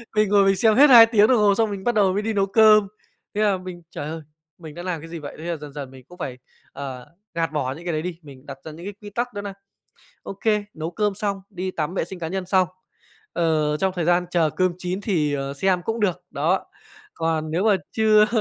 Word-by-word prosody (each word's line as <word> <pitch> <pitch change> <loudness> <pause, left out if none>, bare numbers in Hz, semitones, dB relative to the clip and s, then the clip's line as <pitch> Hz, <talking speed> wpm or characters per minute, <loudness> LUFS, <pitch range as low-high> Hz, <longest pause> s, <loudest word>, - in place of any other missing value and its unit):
Mình 215 -1 +3
ngồi 200 -1 +5
mình 195 0 +4
xem 220 +1 +3
hết 285 +4 +7
2 235 -3 +10
tiếng 220 -2 +4
đồng 255 - +4
hồ 205 -2 +4
xong 220 0 +1
mình 195 -1 -5
bắt 240 +1 0
đầu 195 -3 +3
mới 200 - 0
đi 220 +1 -2
nấu 200 -2 +2
cơm. 215 0 +5 0.5
Thế 210 - 0
là 205 -3 +3
mình, 185 -1 -9
"trời 145 - -5
ơi, 160 +1 -6 0.4
mình 160 -3 -10
đã 175 - -7
làm 180 -4 -3
cái 165 - -10
gì 170 0 -6
vậy?" 145 -2 -8
Thế - - -8
là 170 -1 -2
dần 150 -1 -10
dần 140 -3 -7
mình 130 -1 -14
cũng 180 - -15
phải, 130 -8 -5 0.4
ờ, 135 -3 -7 0.3
gạt 165 -3 -1
bỏ 145 -4 -1
những 165 +5 -12
cái 175 - -1
đấy 155 - -1
đi, 170 0 -5
mình 140 -3 -14
đặt 140 -2 -8
ra 160 - -6
những 165 +3 -10
cái 205 - -5
quy 205 - -8
tắc 240 +4 -3
đó 205 - -4
nà 200 -1 -6 0.7
OK, 195 - -8 0.3
nấu 160 +1 -4
cơm 210 +2 0
xong, 200 -1 -2
đi 185 -1 -4
tắm, 165 0 -3
vệ - - 0
sinh 190 - -9
cá 165 -2 -4
nhân 190 +1 -4
xong, 185 -1 +3 0.6
ờ, 155 -3 +1
trong 190 +4 0
thời 175 - 0
gian 175 +1 +2
chờ 165 -3 +2
cơm 185 +2 +1
chín 185 +1 -3
thì, 160 -8 0
ờ, 140 0 -3
xem 180 +4 +1
cũng 225 +2 -2
được. 180 -4 0
Đó, 160 +6 0 0.5
còn 160 -1 -1
nếu 175 +5 0
mà 210 -3 +4 0.2
chưa 215 -1 +5
180 Hz, 260 wpm, -23 LUFS, 155-205 Hz, 0.7 s, 2